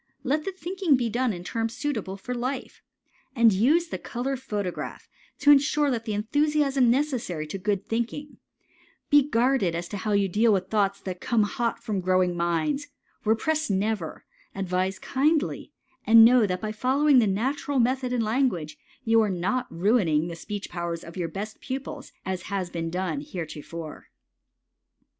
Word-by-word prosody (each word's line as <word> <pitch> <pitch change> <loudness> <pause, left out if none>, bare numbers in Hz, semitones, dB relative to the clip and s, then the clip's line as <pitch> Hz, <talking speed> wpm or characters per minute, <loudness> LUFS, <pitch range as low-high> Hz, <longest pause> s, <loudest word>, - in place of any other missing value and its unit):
Let 295 +3 0
the 390 - -2
thinking 365 -3 0
be 240 -3 -1
done 245 +1 +1
in 175 -3 -6
terms 225 +4 -3
suitable 220 -10 -3
for 245 +6 -5
life. 255 +2 -4 0.5
And 230 -3 +5
use 300 - +3
the - - -4
color 260 +3 -3
photograph 210 -8 -5 0.3
to 290 - +7
insure 290 0 +4
that 230 -2 -3
enthusiasm 275 +4 +2
necessary 240 - 0
to 175 +6 -6
good 200 0 -1
thinking; 240 +6 -3 0.7
be 290 0 +8
guarded 235 - +2
as 170 +1 -3
to 205 - -4
how 210 +2 -2
you 200 -1 +3
deal 220 +5 +3
with 190 -1 -1
thoughts 200 -2 +1
that 185 -2 -6
come 230 -3 +2
hot 235 +1 -2
from 210 -5 -2
growing 185 -1 +2
minds, 175 - 0 0.4
repress 305 +8 +1
never, 200 -3 -2 0.3
advise 185 0 -1
kindly, 300 +3 0 0.3
and 225 0 +8
know 240 -2 +5
that 180 -1 -2
by 215 - -3
following 265 +5 +3
the 225 - +3
natural 265 +8 -1
method 255 +1 +1
in 250 -2 +1
language 215 - 0 0.3
you 225 0 +5
are 215 - +1
not 195 +8 -1
ruining 170 -4 +2
the 170 - -6
speech 205 +4 -6
powers 170 -1 -4
of 170 - -11
your 175 -3 -2
best 205 +5 -6
pupils, 265 0 -6
as 185 -1 -3
has 190 -3 -2
been 165 -1 -3
done 175 -4 -2
heretofore. 160 0 -7
220 Hz, 160 wpm, -26 LUFS, 185-260 Hz, 0.7 s, be